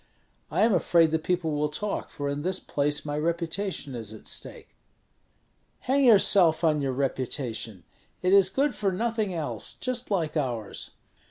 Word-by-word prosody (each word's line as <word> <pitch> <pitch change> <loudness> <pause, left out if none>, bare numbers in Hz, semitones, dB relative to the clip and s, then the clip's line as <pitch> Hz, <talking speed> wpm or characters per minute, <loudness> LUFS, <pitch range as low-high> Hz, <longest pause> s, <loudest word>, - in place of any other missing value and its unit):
I - - 0
am 225 -1 +4
afraid 170 -2 +3
that 160 -1 -1
people 175 -2 0
will 150 0 0
talk, 205 +7 -4
for 145 -1 -5
in 140 +1 -2
this 185 +3 -1
place 145 +1 -1
my 145 0 -3
reputation 170 -1 -2
is 110 -3 -6
at - - -14
stake." - - -5 1.1
"Hang 270 +2 +2
yourself 195 -7 +5
on 155 -2 +3
your 135 -1 0
reputation; 125 - -3 0.4
it 185 +1 +3
is 195 -2 +6
good 275 +7 +1
for 200 -2 -1
nothing 220 +1 -1
else, 165 -4 -3
just 250 -1 -3
like 170 -7 -1
ours." 120 -8 -3
160 Hz, 160 wpm, -27 LUFS, 145-195 Hz, 1.1 s, is